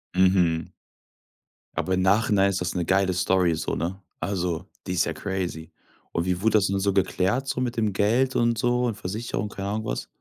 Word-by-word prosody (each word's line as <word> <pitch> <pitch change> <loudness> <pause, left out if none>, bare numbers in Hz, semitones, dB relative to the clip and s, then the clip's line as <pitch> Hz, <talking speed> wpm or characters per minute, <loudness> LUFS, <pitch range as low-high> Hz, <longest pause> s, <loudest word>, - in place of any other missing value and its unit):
Mhm. 90 -4 +3 1.1
Aber 95 - 0
im 95 - +2
Nachhinein 100 0 +3
ist 95 -1 -1
das 90 0 -2
'ne 90 -2 0
geile 95 0 +2
Story 90 -1 +2
so, 80 0 -2
ne? 90 +5 -3 0.2
Also, 90 -3 -2 0.2
die 90 - -1
ist 90 - +2
ja - - -2
crazy. 90 -5 -4 0.4
Und 85 - -1
wie 90 -1 -1
wurde 110 +1 +4
das 100 -1 +2
denn 100 0 0
so 100 +1 +2
geklärt 95 +6 +1
so 130 - -1
mit 125 -1 -2
dem 110 -3 +1
Geld 120 +7 +2
und 120 -1 +2
so 120 +2 +1
und 115 - -2
Versicherung, 105 +1 -3
keine 100 -1 -5
Ahnung, 110 +1 -2
was? - - -3
95 Hz, 200 wpm, -25 LUFS, 90-105 Hz, 1.1 s, wurde